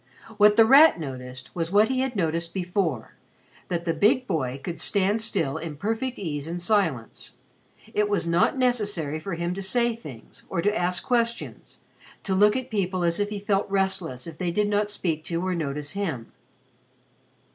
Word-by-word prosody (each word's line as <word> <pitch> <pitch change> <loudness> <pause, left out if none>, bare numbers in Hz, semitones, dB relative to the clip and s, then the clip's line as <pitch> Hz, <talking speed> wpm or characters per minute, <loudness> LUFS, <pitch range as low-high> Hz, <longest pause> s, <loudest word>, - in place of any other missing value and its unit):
What 210 0 +6
The 225 - +7
Rat 280 - +7
noticed 130 -3 -7
was 165 -1 -2
what 210 +2 +5
he 260 -1 0
had 260 -2 -1
noticed 170 -2 -1
before 175 - -2 0.5
that 170 -1 -3
the 165 - +1
big 235 - +3
boy 135 - -2
could 170 +1 -5
stand 200 +2 +1
still 150 -10 -1
in 160 -2 -6
perfect 225 - -2
ease 150 -5 -4
and 170 +2 -4
silence. 175 - -1 0.6
It 210 0 +1
was 205 -4 0
not 170 +9 +2
necessary 205 - 0
for 180 +2 -5
him 170 +1 -2
to 195 - -5
say 235 +4 +1
things 145 - -12
or 190 - -2
to 205 +5 +1
ask 180 -1 0
questions 235 -2 -2 0.4
to 195 - -1
look 210 +2 +4
at 260 -1 -4
people 185 -3 -1
as 170 +1 +1
if 205 0 0
he 210 - -4
felt 200 0 0
restless 190 -9 -1
if 165 -2 -9
they 180 -2 -1
did 205 +4 0
not 205 0 +1
speak 165 -6 -2
to 170 +1 -2
or 185 - 0
notice 150 -3 -3
him. 165 - -4
185 Hz, 180 wpm, -25 LUFS, 165-210 Hz, 0.6 s, The